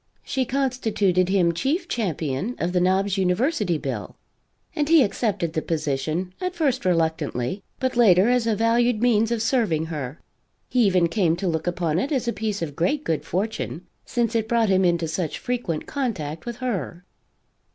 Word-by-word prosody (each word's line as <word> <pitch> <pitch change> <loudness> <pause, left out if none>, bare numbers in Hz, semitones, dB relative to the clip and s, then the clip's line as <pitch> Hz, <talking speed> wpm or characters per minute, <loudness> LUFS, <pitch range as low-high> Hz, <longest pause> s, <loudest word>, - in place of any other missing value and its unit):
She 265 -2 -1
constituted 225 -9 +1
him 185 -3 +3
chief 275 - -1
champion 180 - -2
of 170 - -1
the 180 - +2
Knobs 190 +2 +2
University 190 - +1
bill, 130 -10 -5 0.6
and 295 0 0
he 325 -4 +7
accepted 200 -6 -1
the 160 - 0
position, 155 +3 -2
at 365 0 -2
first 275 - 0
reluctantly, 160 -3 0 0.2
but 260 -1 -1
later 200 -5 +5
as 245 -1 +2
a 220 - +2
valued 230 +1 +2
means 225 -1 +3
of 230 -2 0
serving 220 - +1
her 140 -1 -5 0.5
he 250 -2 +3
even 180 -3 +3
came 170 -2 +1
to 185 +2 -3
look 160 0 -1
upon 175 -2 0
it 270 - -2
as 260 -4 0
a 235 - +1
piece 210 -4 -2
of 145 -3 -5
great 275 - 0
good 160 - -1
fortune, 180 - -3 0.2
since 235 -2 -1
it 225 -1 0
brought 230 -3 +2
him 190 0 +3
into 170 -2 +2
such 160 0 -2
frequent 240 -11 -3
contact 175 - -3
with 240 - -3
her. 195 -8 -4
195 Hz, 170 wpm, -24 LUFS, 165-240 Hz, 0.6 s, he